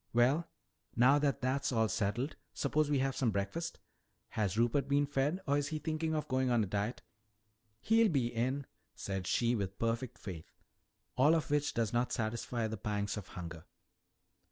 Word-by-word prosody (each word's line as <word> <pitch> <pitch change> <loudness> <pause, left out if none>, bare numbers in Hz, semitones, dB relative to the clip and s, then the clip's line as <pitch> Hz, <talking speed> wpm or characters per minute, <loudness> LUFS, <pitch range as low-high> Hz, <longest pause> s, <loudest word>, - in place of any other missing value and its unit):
Well, 135 +8 +3 0.5
now 130 +5 +6
that 145 -2 0
that's 130 +2 0
all 115 -2 +3
settled, 110 +7 -1 0.2
suppose 150 +1 +1
we 145 - +3
have 135 0 0
some 125 - +1
breakfast. 105 +12 -2 0.5
Has 105 -2 -1
Rupert 120 +4 +2
been 140 +1 +3
fed 145 +5 0
or 145 0 +2
is 145 - -2
he 155 - -2
thinking 160 +1 -1
of 155 - -2
going 130 -1 +1
on 120 -2 +3
a - - 0
diet?" 105 +5 -2 0.8
"He'll 225 0 +4
be 135 -8 +2
in 130 +4 -1
" - - -44
"Said 95 -1 -4
she 120 0 +2
with 100 -4 -2
perfect 115 +2 -1
faith. 90 -6 -8 0.7
All 145 +6 +6
of 155 -3 -1
which 145 0 +1
does 115 -2 0
not 120 +1 +1
satisfy 115 0 -2
the 110 0 -3
pangs 105 -1 -2
of 100 -2 -6
hunger." 85 -3 -8
125 Hz, 180 wpm, -33 LUFS, 110-145 Hz, 0.8 s, now